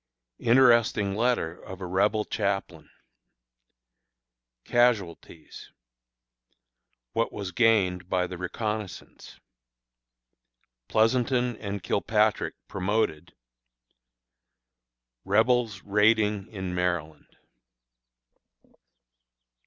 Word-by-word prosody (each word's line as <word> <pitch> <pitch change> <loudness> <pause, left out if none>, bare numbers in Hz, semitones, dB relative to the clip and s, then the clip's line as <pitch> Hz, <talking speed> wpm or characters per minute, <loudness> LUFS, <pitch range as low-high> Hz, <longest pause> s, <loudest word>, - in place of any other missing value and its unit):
Interesting 115 -5 +4
Letter 110 -7 -1
of 95 0 -9
a 95 - -6
Rebel 105 +4 +1
Chaplain. 95 -7 -3 1.8
Casualties. 100 -9 -1 1.4
What 115 - 0
was 100 -3 -6
Gained 95 -6 +2
by 90 -1 +1
the 90 - -7
Reconnoissance. 105 +2 -6 1.5
Pleasonton 120 +2 +1
and 100 -3 -6
Kilpatrick 105 +1 0
Promoted. 100 -4 -2 1.9
Rebels 110 +1 +1
Raiding 105 -1 +2
in 95 -4 -6
Maryland. 85 -4 -3
105 Hz, 65 wpm, -26 LUFS, 90-115 Hz, 1.9 s, Interesting